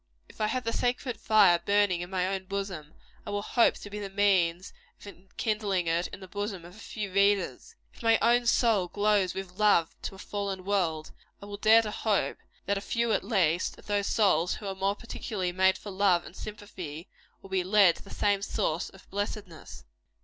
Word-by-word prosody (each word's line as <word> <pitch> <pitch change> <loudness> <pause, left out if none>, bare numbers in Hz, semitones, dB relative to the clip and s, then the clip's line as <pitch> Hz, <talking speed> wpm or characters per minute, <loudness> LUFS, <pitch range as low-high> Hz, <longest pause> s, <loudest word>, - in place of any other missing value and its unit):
If - - -12
I 215 - +2
have 255 +3 -2
the 230 - -2
sacred 245 -2 -1
fire 205 -6 +5
burning 200 -3 +2
in 175 - -6
my 185 -1 0
own 190 0 -3
bosom, 190 -6 -5 0.3
I - - -8
will 205 0 -2
hope 235 +1 +3
to 205 - -10
be 210 - -5
the 200 -1 -5
means 190 -3 +1 0.3
of - - -14
enkindling 200 0 -2
it 165 +2 0
in - - -11
the 190 - -9
bosom 200 -2 -5
of 175 +2 -13
a - - -14
few 205 -4 -6
readers. 200 -8 +1 0.2
If - - -16
my 225 -1 +4
own 240 +1 +3
soul 225 -7 +3
glows 205 -1 +1
with 190 0 -7
love 205 -6 +4
to - - -5
a - - -13
fallen 195 -2 -4
world, 170 -6 -1 0.3
I - - -10
will 205 0 -7
dare 220 +2 +6
to 210 - -4
hope 210 -1 0 0.3
that 200 0 0
a - - -11
few, 235 +2 -1
at - - 0
least, 185 -5 +1
of - - -16
those 205 -1 0
whose - - -1
souls 180 -6 +2
are 195 -1 -3
more 195 +1 -1
particularly 205 -5 -4
made 190 +1 +3
for 205 - -9
love 190 -3 +2
and - - -12
sympathy, 190 -7 -8 0.4
will 195 - -13
be 190 -1 +1
led 190 -2 +5
to - - -14
the 195 - -14
same 205 -1 +1
source 170 -3 -2
of 190 - -18
blessedness. 195 - -6
200 Hz, 210 wpm, -28 LUFS, 185-210 Hz, 0.4 s, dare